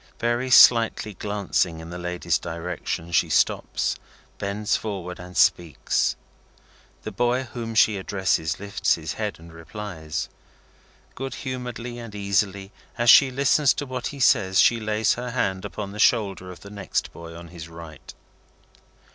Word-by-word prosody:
Very 120 Hz, +2 st, 0 dB
slightly 115 Hz, -3 st, +6 dB
glancing 100 Hz, -4 st, -1 dB
in 80 Hz, +1 st, -9 dB
the 90 Hz, -, -6 dB
lady's 90 Hz, 0 st, -1 dB
direction, 80 Hz, +1 st, -5 dB
she 80 Hz, -, +2 dB
stops, -, -, +1 dB, 0.4 s
bends 105 Hz, +1 st, -1 dB
forward, 95 Hz, -4 st, -5 dB
and 90 Hz, 0 st, -9 dB
speaks. 85 Hz, -6 st, +2 dB, 0.9 s
The -, -, -5 dB
boy 125 Hz, +2 st, +1 dB
whom 115 Hz, -2 st, -6 dB
she 110 Hz, -1 st, +4 dB
addresses, 95 Hz, -3 st, -1 dB
lifts 100 Hz, 0 st, 0 dB
his 80 Hz, -2 st, -5 dB
head 105 Hz, -2 st, -4 dB
and 80 Hz, 0 st, -14 dB
replies. 80 Hz, -3 st, -6 dB, 0.9 s
Good 135 Hz, +1 st, -5 dB
humouredly 125 Hz, -2 st, -5 dB
and 115 Hz, -3 st, -9 dB
easily, 100 Hz, -1 st, -1 dB, 0.3 s
as 120 Hz, -1 st, +6 dB
she 140 Hz, -, +8 dB
listens 140 Hz, +1 st, +3 dB
to 145 Hz, -, -3 dB
what 130 Hz, -2 st, -4 dB
he 140 Hz, -, -8 dB
says, 100 Hz, -7 st, +3 dB
she 115 Hz, -, +5 dB
lays 110 Hz, 0 st, +1 dB
her 125 Hz, +1 st, -5 dB
hand 95 Hz, -6 st, -1 dB
upon 100 Hz, -2 st, -6 dB
the 105 Hz, -, -9 dB
shoulder 100 Hz, -5 st, +2 dB
of 90 Hz, -, -11 dB
the 100 Hz, -, -11 dB
next 100 Hz, -1 st, -3 dB
boy 85 Hz, 0 st, -10 dB
on 85 Hz, 0 st, -10 dB
his 85 Hz, -2 st, -10 dB
right. 80 Hz, -1 st, -11 dB
100 Hz, 150 wpm, -24 LUFS, 90-120 Hz, 0.9 s, she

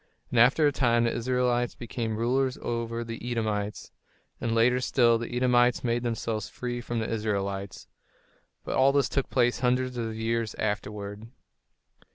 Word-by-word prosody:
And 120 Hz, -, +2 dB
after 130 Hz, +6 st, +5 dB
a 145 Hz, -, +4 dB
time 120 Hz, -4 st, +2 dB
the 115 Hz, -, +1 dB
Israelites 120 Hz, 0 st, 0 dB
became 115 Hz, -2 st, -4 dB
rulers 130 Hz, +3 st, +1 dB
over 115 Hz, 0 st, -2 dB
the 115 Hz, 0 st, -7 dB
Edomites; 110 Hz, -4 st, -2 dB, 0.5 s
and 115 Hz, -1 st, 0 dB
later 125 Hz, +2 st, +4 dB
still, 120 Hz, -3 st, +3 dB
the 115 Hz, -, -5 dB
Edomites 125 Hz, -1 st, +3 dB
made 120 Hz, -1 st, 0 dB
themselves 115 Hz, -3 st, -3 dB
free 120 Hz, -1 st, -4 dB
from 120 Hz, 0 st, -4 dB
the 110 Hz, -, -1 dB
Israelites. 100 Hz, -3 st, -3 dB, 0.8 s
But -, -, -4 dB
all 135 Hz, +1 st, +5 dB
this 140 Hz, -3 st, +3 dB
took 135 Hz, -, -1 dB
place 120 Hz, -1 st, +2 dB
hundreds 125 Hz, 0 st, 0 dB
of 115 Hz, -2 st, -3 dB
years 115 Hz, 0 st, -1 dB
afterward. 105 Hz, 0 st, -4 dB
120 Hz, 155 wpm, -27 LUFS, 110-125 Hz, 0.8 s, after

